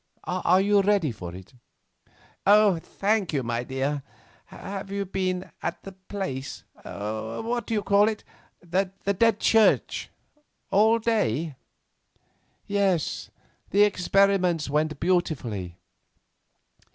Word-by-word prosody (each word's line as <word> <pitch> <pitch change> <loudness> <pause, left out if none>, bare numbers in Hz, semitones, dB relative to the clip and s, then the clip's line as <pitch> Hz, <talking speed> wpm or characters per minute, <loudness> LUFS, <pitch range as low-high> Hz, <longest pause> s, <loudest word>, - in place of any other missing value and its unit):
Are 185 0 +2
you 205 0 +4
ready 195 -7 +2
for 90 -5 -8
it?" 95 +7 -12 0.9
"Thank 205 -1 +3
you, 135 -3 0
my 120 0 -2
dear. 135 +3 -2 0.4
Have 195 0 -7
you 200 0 -2
been 185 -1 -2
at - - -4
that 190 -1 -13
place—what 130 - -5
do 230 - -2
you 210 - 0
call 205 +1 +4
it?—the 195 -2 -4
Dead 230 -2 +4
Church, 225 -1 +3 0.6
all 220 +3 +5
day?" 170 - 0 1.1
"Yes, 195 -6 0
and - - -39 0.4
the 205 +1 +6
experiments 185 -5 +2
went 155 0 0
beautifully." 130 - -1
185 Hz, 105 wpm, -26 LUFS, 145-200 Hz, 1.1 s, the